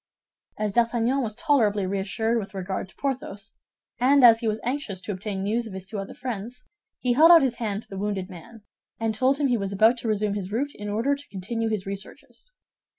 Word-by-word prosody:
As 210 -2 -2
D'Artagnan 235 +3 +2
was 220 -4 -3
tolerably 225 - +2
reassured 200 +4 -1
with 195 -2 -8
regard 190 0 -4
to - - -20
Porthos, 245 -7 -4 0.5
and 270 +2 +5
as 230 -2 +8
he 230 - -2
was 215 0 0
anxious 245 -6 -3
to 210 - -4
obtain 195 0 -4
news 225 +3 -1
of 210 - -9
his 190 -1 -6
two 205 +1 -5
other 195 - -7
friends, 250 0 -6 0.3
he 250 -1 +1
held 315 +6 +7
out 335 -4 +9
his 250 -3 0
hand 215 -2 -3
to - - -19
the 195 - -6
wounded 200 -2 -2
man, 200 +4 -12 0.4
and 225 -1 0
told 260 +5 +2
him 290 - 0
he 245 -3 +2
was 195 -2 -3
about 220 +5 +4
to 235 - -5
resume 210 -1 0
his 200 -2 -4
route 280 +6 -1
in 210 0 -7
order 230 +7 +1
to 285 +1 -12
continue 225 +4 -3
his 215 -3 -2
researches. 200 - -8
220 Hz, 215 wpm, -25 LUFS, 200-245 Hz, 0.5 s, out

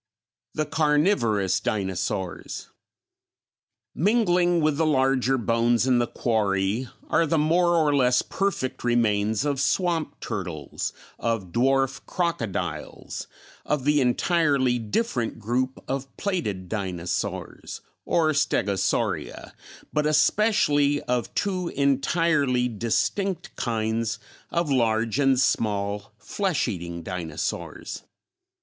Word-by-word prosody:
The 155 - 0
Carnivorous 145 - +2
Dinosaurs. 95 -3 -3 1.2
Mingling 175 -3 +3
with 155 -2 +1
the 160 - +2
larger 135 -2 +2
bones 115 0 +2
in 125 -2 +3
the 120 - +1
quarry 105 +1 0 0.2
are 165 - +3
the 165 - +1
more 170 +3 +3
or 150 -3 +3
less 125 -2 +3
perfect 195 -10 -2
remains 110 -1 +1
of 140 -2 0
swamp 165 +2 0
turtles, 90 - -4 0.3
of 110 -6 -2
dwarf 135 +3 +1
crocodiles, 100 - -3 0.4
of 150 -3 -1
the 150 0 +4
entirely 135 -1 +2
different 120 - -1
group 125 +4 -1
of 135 0 -4
plated 110 - -2
dinosaurs, 90 -4 -4 0.2
or 160 -2 +2
Stegosauria, 100 -9 0 0.4
but 150 0 +2
especially 150 -3 +3
of 125 -1 -1
two 185 -3 -1
entirely 140 -2 +2
distinct 125 - -1
kinds 110 -1 -1 0.3
of 170 -3 -1
large 115 -1 +1
and 135 -2 +4
small 100 -4 0
flesh 190 - -1
eating 85 -2 -5
dinosaurs. 85 -4 -4
130 Hz, 100 wpm, -25 LUFS, 110-155 Hz, 1.2 s, the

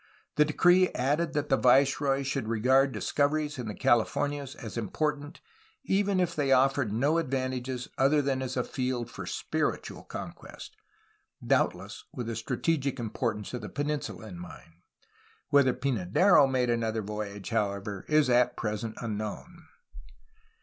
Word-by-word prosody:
The 150 - +5
decree 175 +4 +4
added 150 +6 0
that 145 -1 -1
the 135 - +4
viceroy 135 +2 +3
should 135 -3 -2
regard 130 +5 +3
discoveries 145 +1 0
in 120 - -4
the 105 - -5
Calif 120 -2 +2
ornias 145 -1 -2
as 110 -8 -8
important, 145 +6 -3 0.4
even 200 -4 +1
if 175 -1 0
they 140 -3 0
offered 135 -3 +3
no 140 +9 +2
advantages 130 -3 -3
other 140 +3 +4
than 135 -2 0
as 130 0 -4
a 125 - +1
field 125 -2 -3
for - - -7
spiritual - - -2
conquest, - - -9 0.4
— - - -20
doubtless - - 0
with 120 - -5
the 115 0 -4
strategic 135 +4 -1
importance 115 -1 -3
of 125 - -4
the - - -7
peninsula 145 -5 -3
in 90 -5 -9
mind. 85 -2 -11 0.8
Whether 140 -3 +5
Pynadero 130 - +3
made 125 -2 +1
another 115 -2 -1
voyage, 105 0 -6
however, 100 -2 -2
is 150 -2 +4
at 125 0 +3
present 110 0 -3
unknown. 115 - -6
130 Hz, 145 wpm, -29 LUFS, 115-145 Hz, 0.8 s, The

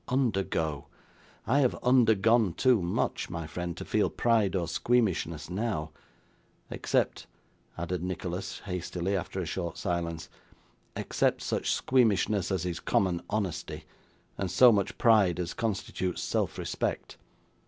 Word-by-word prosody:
Undergo! 95 - 0 0.6
I 135 +5 +3
have 130 -4 +2
undergone 115 -4 +4
too 125 -1 +3
much, 85 0 -1
my 85 -1 -4
friend, 85 +3 -5
to - - -6
feel - - +1
pride 110 -5 +2
or 85 -3 0
squeamishness 85 -7 0
now. 90 -5 -2 0.8
Except - - -1 0.2
' - - -35
added 85 0 -3
Nicholas 90 +1 -4
hastily, 90 0 -3
after 95 +1 -3
a 90 - -2
short 85 0 -4
silence, 85 -2 -3 0.7
'except - - 0
such - - -1
squeamishness 105 -6 +2
as 90 -2 -1
is 90 -2 -3
common 90 -3 +1
honesty, 100 -5 -3 0.6
and 95 - -1
so 125 +4 +7
much 100 -3 0
pride 105 -7 +4
as 85 -1 -3
constitutes 100 -4 -2
self - - -1
respect. - - -3
95 Hz, 130 wpm, -29 LUFS, 85-110 Hz, 0.8 s, so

